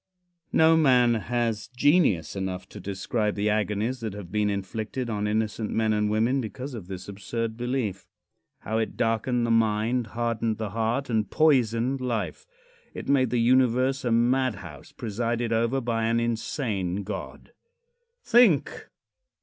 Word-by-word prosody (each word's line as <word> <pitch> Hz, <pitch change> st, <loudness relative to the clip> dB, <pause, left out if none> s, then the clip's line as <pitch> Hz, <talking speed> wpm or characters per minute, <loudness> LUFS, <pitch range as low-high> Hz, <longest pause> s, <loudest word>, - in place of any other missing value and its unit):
No 160 Hz, 0 st, +5 dB
man 125 Hz, -6 st, +4 dB
has 115 Hz, -1 st, -1 dB
genius 125 Hz, -, +2 dB
enough 95 Hz, -1 st, -4 dB
to -, -, -10 dB
describe 105 Hz, +2 st, -2 dB
the 105 Hz, +1 st, +1 dB
agonies 110 Hz, +4 st, -1 dB
that 110 Hz, -4 st, -4 dB
have 100 Hz, -4 st, -9 dB
been 105 Hz, 0 st, +1 dB
inflicted 110 Hz, +5 st, -3 dB
on 105 Hz, -1 st, -1 dB
innocent 110 Hz, 0 st, -1 dB
men 110 Hz, -1 st, +1 dB
and 105 Hz, 0 st, +1 dB
women 115 Hz, +6 st, +1 dB
because 125 Hz, +5 st, -6 dB
of 105 Hz, -7 st, -8 dB
this 95 Hz, -1 st, -7 dB
absurd 110 Hz, +3 st, -4 dB
belief. 120 Hz, -6 st, -3 dB, 0.5 s
How 110 Hz, +2 st, -1 dB
it 110 Hz, -, -3 dB
darkened 120 Hz, +1 st, +1 dB
the 115 Hz, -, 0 dB
mind, 115 Hz, +2 st, +1 dB
hardened 115 Hz, -2 st, -1 dB
the 110 Hz, -3 st, -4 dB
heart, 115 Hz, +5 st, -1 dB
and 110 Hz, -2 st, 0 dB
poisoned 130 Hz, -4 st, +2 dB
life! 120 Hz, -, -3 dB, 0.5 s
It -, -, -7 dB
made 130 Hz, -3 st, +3 dB
the 120 Hz, -, 0 dB
Universe 130 Hz, +2 st, +3 dB
a 120 Hz, -, 0 dB
madhouse 115 Hz, -, 0 dB
presided 115 Hz, +1 st, -2 dB
over 115 Hz, +4 st, +1 dB
by 115 Hz, -2 st, -1 dB
an 115 Hz, +1 st, +2 dB
insane 110 Hz, -5 st, -2 dB
God. 95 Hz, 0 st, -7 dB, 0.7 s
Think! 230 Hz, -, +3 dB
115 Hz, 145 wpm, -26 LUFS, 105-125 Hz, 0.7 s, No